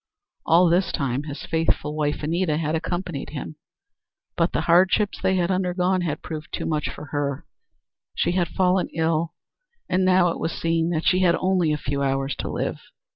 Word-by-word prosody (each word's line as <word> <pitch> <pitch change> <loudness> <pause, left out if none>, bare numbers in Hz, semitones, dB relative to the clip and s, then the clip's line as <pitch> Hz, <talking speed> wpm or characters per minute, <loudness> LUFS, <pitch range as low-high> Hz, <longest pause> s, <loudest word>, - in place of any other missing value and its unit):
All 170 +2 +6
this 175 +2 +2
time 135 +1 -1
his 145 -1 -6
faithful 160 -2 0
wife, 150 -1 -1
Anita, 165 0 0
had 155 -1 -1
accompanied 175 -2 -3
him 155 +1 -7 0.8
but - - +1
the - - 0
hardships 190 +4 +3
they 190 0 +2
had 180 0 +1
undergone 185 0 +1
had 155 -3 -3
proved 155 -1 -6
too - - -3
much 150 -2 -1
for 150 - -9
her; 140 -2 -2 0.7
she - - +1
had 175 -1 +1
fallen 185 +2 +1
ill 160 0 0 0.5
and 185 +1 +1
now 185 -1 +4
it - - -3
was 165 - -2
seen 165 0 0
that 165 -2 -1
she 185 - +4
had 180 -2 +4
only 185 -4 +1
a 150 - +1
few 140 0 -3
hours 135 0 0
to - - -4
live. - - -2
165 Hz, 180 wpm, -24 LUFS, 150-180 Hz, 0.8 s, All